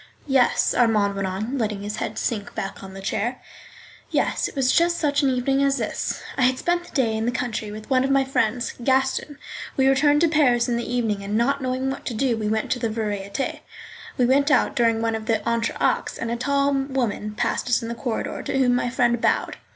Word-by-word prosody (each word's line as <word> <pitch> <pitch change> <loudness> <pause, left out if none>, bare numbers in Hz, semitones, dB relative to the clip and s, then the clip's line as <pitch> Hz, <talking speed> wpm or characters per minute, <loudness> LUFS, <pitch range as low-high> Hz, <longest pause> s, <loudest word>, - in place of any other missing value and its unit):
Yes 265 -3 +3
(Armand 215 -4 +3
went 195 -1 -1
on, 215 +8 -3
letting 210 -3 -2
his 210 +1 -4
head - - -4
sink 210 -4 -3
back 195 -2 -5
on 190 0 -10
the 195 - -8
chair), 240 +6 -2 0.7
yes, - - 0
it - - -11
was 265 -2 +2
just 340 0 +3
such 290 -2 +1
an 275 - +3
evening 265 +2 +1
as 275 0 +2
this. - - -3 0.2
I - - +2
had 255 0 +3
spent 350 +3 0
the - - -17
day 235 -6 +2
in 220 +1 -1
the - - +2
country 225 -4 -3
with 215 +1 -9
one 260 -2 +3
of 270 - 0
my 275 0 +3
friends, 240 -2 0
Gaston 265 +3 +1
R—. 285 - -21 0.4
We 265 0 +4
returned 290 +2 +4
to 335 - +5
Paris 270 -7 +3
in 240 - 0
the 235 0 -3
evening, 220 -5 -1
and 205 +2 -1
not 275 +4 +1
knowing 260 +1 -1
what 270 - -6
to 235 - -3
do 250 +1 +1
we 215 -1 -2
went 220 0 -1
to 250 - +1
the 230 -2 -1
Variétés. 210 +1 -3 0.6
We 250 - +3
went 280 +4 +3
out 295 - +3
during 230 -3 +2
one 225 0 +1
of 220 -1 -4
the 225 - +3
entr'actes, 235 0 0
and 230 - -3
a - - 0
tall 280 +3 +1
woman 260 -6 -2
passed - - -1
us 245 0 +2
in - - -4
the 235 - -3
corridor, 235 0 -3
to - - -2
whom 255 -2 +3
my 245 0 0
friend 240 -1 +1
bowed. - - +1
245 Hz, 230 wpm, -23 LUFS, 220-270 Hz, 0.7 s, to